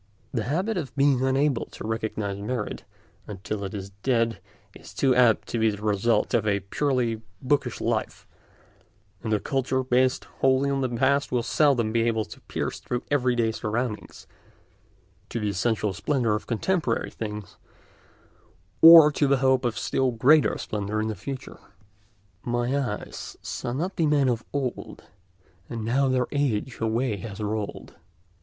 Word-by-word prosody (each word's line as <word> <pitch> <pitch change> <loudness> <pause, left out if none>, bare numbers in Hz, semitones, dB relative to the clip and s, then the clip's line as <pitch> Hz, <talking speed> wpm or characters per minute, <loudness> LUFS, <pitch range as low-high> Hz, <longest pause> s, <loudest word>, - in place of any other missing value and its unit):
The 115 -5 -2
habit 185 - -1
of 155 -7 -5
being 135 -2 +3
unable 135 -1 +1
to - - -9
recognise 110 -3 -3
merit 105 0 -4 0.4
until 100 +1 -5
it 100 +2 -5
is 100 -1 -6
dead 115 -2 +1 0.3
is - - -14
too 135 -2 +3
apt 120 -3 +4
to 115 - -2
be 110 0 +3
the 105 0 -6
result 105 +2 +1
of 110 -3 +2
a 100 -1 +1
purely 120 0 -1 0.2
bookish 140 +2 0
life, - - -2 0.9
and 110 - -4
a 105 - +2
culture 130 0 -1
based 130 0 +1
wholly 135 +1 +3
on 135 0 0
the 130 - 0
past 135 +4 +1
will 125 -2 +1
seldom 130 -5 +2
be 115 0 +2
able 115 -2 0
to - - -13
pierce - - -4
through 125 +1 -4
everyday 125 -5 +2
surroundings 110 0 -4 1.0
to 115 - -3
the 105 -1 -1
essential 105 +1 0
splendour 120 - 0
of 105 - -3
contemporary 130 - -1
things, 105 -3 -7 1.2
or 165 -2 +10
to 145 0 +1
the 140 0 +3
hope 130 0 +2
of 120 -3 -1
still 130 -1 0
greater 130 +6 +4
splendour 105 0 -3
in 110 0 -1
the 110 - -3
future. 130 +8 -7 0.8
"My 120 +2 -1
eyes 125 -7 -4
saw 120 - -4
not 170 +10 -3
the 160 - +2
men 145 -3 +3
of 120 -1 -1
old; 135 -4 -4 0.7
And 115 -2 -4
now 135 +4 +2
their 130 -1 +1
age 130 -4 -1
away 115 0 0
has 100 +1 -8
rolled. 105 -1 -4
120 Hz, 155 wpm, -25 LUFS, 110-135 Hz, 1.2 s, or